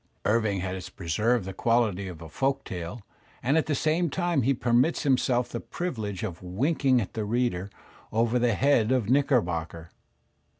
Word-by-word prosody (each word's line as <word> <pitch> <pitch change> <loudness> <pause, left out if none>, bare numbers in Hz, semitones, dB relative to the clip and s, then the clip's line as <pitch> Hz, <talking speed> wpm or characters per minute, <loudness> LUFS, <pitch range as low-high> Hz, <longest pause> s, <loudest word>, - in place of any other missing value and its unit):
Irving 105 -3 +1
has 95 0 -4
preserved 105 +5 0
the 95 - -5
quality 110 -3 +1
of 85 -3 -8
a - - -8
folk 135 - -1
tale, 90 +5 -6 0.4
and 135 +5 +2
at 160 - +2
the 150 - +1
same 160 +4 +1
time 175 -3 0
he 130 +3 +2
permits 125 +4 +2
himself 125 -3 +2
the 120 - -4
privilege 110 - -4
of 90 -5 -5
winking 130 - +1
at 100 - -4
the 110 - -2
reader 105 -4 -1 0.4
over 115 +2 +2
the 120 -2 +2
head 130 -2 +3
of 125 -4 +1
Knickerbocker. 85 - 0
115 Hz, 165 wpm, -27 LUFS, 95-135 Hz, 0.4 s, head